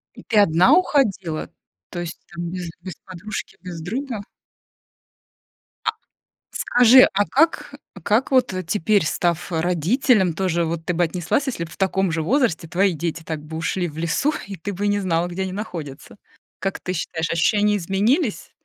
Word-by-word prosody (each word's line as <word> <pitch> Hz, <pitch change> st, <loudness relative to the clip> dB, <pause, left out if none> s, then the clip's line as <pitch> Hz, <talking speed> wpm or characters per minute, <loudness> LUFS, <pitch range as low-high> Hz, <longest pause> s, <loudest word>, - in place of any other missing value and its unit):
И -, -, -12 dB
ты 220 Hz, -, -1 dB
одна 175 Hz, -1 st, +5 dB
уходила? 195 Hz, -, +1 dB, 0.4 s
То 175 Hz, -, -6 dB
есть, 175 Hz, 0 st, -5 dB, 0.2 s
там, 170 Hz, 0 st, -4 dB
без 180 Hz, -2 st, -5 dB
без 185 Hz, -3 st, -7 dB
подружки, 190 Hz, +3 st, -7 dB
без 175 Hz, -3 st, -7 dB
друга? 230 Hz, -, -4 dB, 1.6 s
А -, -, +3 dB, 0.6 s
скажи, 245 Hz, +1 st, +6 dB
а 205 Hz, +1 st, +3 dB
как, 325 Hz, +3 st, +2 dB
э, -, -, -10 dB, 0.2 s
а 195 Hz, -, -11 dB
как 220 Hz, -, +1 dB
вот, 255 Hz, -6 st, +3 dB
э, 185 Hz, -, -2 dB
теперь, 200 Hz, +1 st, +1 dB
став, 175 Hz, +1 st, -1 dB
э, 160 Hz, -, +1 dB
родителем, 180 Hz, -, +2 dB
тоже 175 Hz, -2 st, 0 dB
вот 165 Hz, 0 st, -3 dB
ты 180 Hz, -, -1 dB
бы 175 Hz, -, +1 dB
отнеслась, 175 Hz, -, -1 dB
если 200 Hz, -10 st, -3 dB
бы 165 Hz, -, -11 dB
в -, -, -12 dB
таком 190 Hz, -2 st, +1 dB
же 165 Hz, -1 st, -1 dB
возрасте 180 Hz, -, +1 dB
твои 185 Hz, +2 st, +2 dB
дети 165 Hz, 0 st, -3 dB
так 160 Hz, -2 st, -5 dB
бы 160 Hz, +1 st, -8 dB
ушли 175 Hz, +2 st, -1 dB
в 150 Hz, -, -11 dB
лесу, 170 Hz, -, +1 dB
и 195 Hz, -1 st, -7 dB
ты 200 Hz, +5 st, -5 dB
бы 205 Hz, +3 st, -2 dB
не 205 Hz, 0 st, +1 dB
знала, 175 Hz, -2 st, 0 dB
где 180 Hz, +2 st, -4 dB
они 190 Hz, -1 st, -3 dB
находятся? 170 Hz, -8 st, -7 dB, 0.4 s
Как 195 Hz, -, -3 dB
ты 185 Hz, -, -3 dB
считаешь, 165 Hz, -1 st, -3 dB
ощущения 205 Hz, +5 st, +2 dB
изменились? 210 Hz, -, 0 dB
185 Hz, 180 wpm, -22 LUFS, 165-210 Hz, 1.6 s, скажи